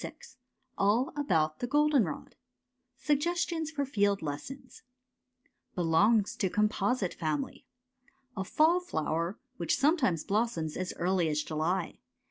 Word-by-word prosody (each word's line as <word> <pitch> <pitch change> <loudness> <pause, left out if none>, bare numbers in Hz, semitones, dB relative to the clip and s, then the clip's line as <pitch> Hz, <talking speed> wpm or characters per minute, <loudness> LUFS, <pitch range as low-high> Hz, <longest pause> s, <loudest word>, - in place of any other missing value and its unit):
i - - -2
i - - -15 0.7
ALL 215 +7 +2
ABOUT 160 - +1
THE 245 - -2
GOLDENROD 285 - +1 0.6
SUGGESTIONS 325 +2 0
FOR 290 -3 -2
FIELD 205 -7 +1
LESSONS 255 - -7 0.9
Belongs 195 +6 +3
to 190 - 0
composite 210 0 0
family. 155 -4 -3 0.7
A 190 - -2
fall 320 - +3
flower, 170 - -2 0.2
which 170 - 0
sometimes 270 - +2
blossoms 195 -7 -1
as 185 0 -3
early 180 -1 +1
as 150 0 0
July. 165 +4 -2
200 Hz, 115 wpm, -30 LUFS, 165-275 Hz, 0.9 s, Belongs